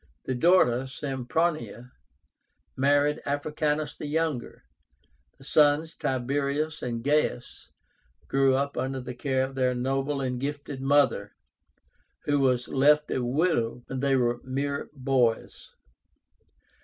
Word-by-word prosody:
The 130 - -1
daughter, 130 -4 +3
SEMPRONIA, 130 -2 -2 0.8
married 145 +2 +2
Africánus 150 +1 -2
the 150 - -6
younger. 155 - -2 0.7
The - - -17
sons, 150 +2 +3
TIBERIUS 140 +4 -2
and 115 -2 -4
GAIUS, 145 -3 -1 0.6
grew 135 -1 +3
up 140 +1 -2
under 135 0 -2
the 125 0 -6
care 130 +1 0
of 135 +1 -4
their 130 -1 +1
noble 135 +3 -1
and 125 -2 -2
gifted 140 -1 -5
mother, 145 +2 +2 0.9
who 145 -1 +1
was 125 -3 +1
left 150 +2 +3
a 130 - -1
widow 125 -3 0
when 130 - -5
they 135 0 +2
were 120 -1 +1
mere 140 +2 -3
boys. 130 -4 0
135 Hz, 120 wpm, -27 LUFS, 125-145 Hz, 0.9 s, daughter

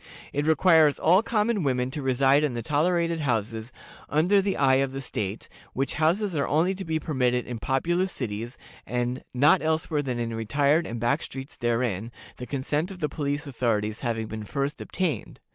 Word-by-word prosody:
It 145 +2 -1
requires 160 -2 +5
all 180 +5 +4
common 220 -1 0
women 130 -3 0
to 150 +1 -4
reside 135 +2 +3
in 140 -5 0
the 115 - -3
tolerated 170 +4 +1
houses 115 -4 -2 0.4
"under 180 +7 +3
the 195 0 -1
eye 135 -1 +4
of 135 0 0
the 135 - -4
state," 110 -6 -4 0.3
which 135 +2 -1
houses 170 +5 +1
are 140 - 0
only 165 +5 +2
to 190 0 -6
be 160 -2 -1
permitted 125 -5 0
in 120 -2 -5
populous 175 +10 0
cities, 115 -2 -5 0.3
and 125 +1 -2
"not 150 +8 +4
elsewhere 160 -1 0
than 130 -4 -3
in 115 -1 -2
retired 140 +8 +1
and 115 0 -5
back 120 +7 +1
streets 135 +2 -8
therein, 115 -3 -1 0.3
the 125 - -7
consent 145 +5 -1
of 195 - -8
the 150 -4 -2
police 145 0 -2
authorities 115 -5 -1
having 115 -3 -2
been 110 0 -6
first 140 +7 -3
obtained." 180 -5 -3
140 Hz, 180 wpm, -26 LUFS, 120-160 Hz, 0.4 s, requires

